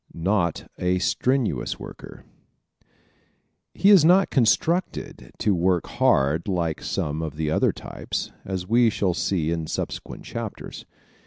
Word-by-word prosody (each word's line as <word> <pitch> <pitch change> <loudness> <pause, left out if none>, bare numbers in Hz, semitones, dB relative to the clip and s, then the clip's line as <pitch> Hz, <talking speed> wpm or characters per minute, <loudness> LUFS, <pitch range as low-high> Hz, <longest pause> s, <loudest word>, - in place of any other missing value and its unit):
Not 85 -1 0
a 90 0 +1
Strenuous 120 - 0
Worker - - -11 0.6
¶ - - -47 0.9
He 200 - +5
is 190 -6 +8
not 185 +4 +5
constructed 160 +8 0
to 105 - +1
work 90 0 +1
hard 70 +6 +1
like 85 -5 -1
some 75 +2 -2
of 80 -2 -5
the 75 0 -2
other - - +2
types, - - -5
as 95 -2 -4
we 115 +2 +4
shall 95 -4 0
see 85 -2 -1
in 80 -2 -2
subsequent - - -5
chapters. - - -7
90 Hz, 135 wpm, -24 LUFS, 80-115 Hz, 0.9 s, is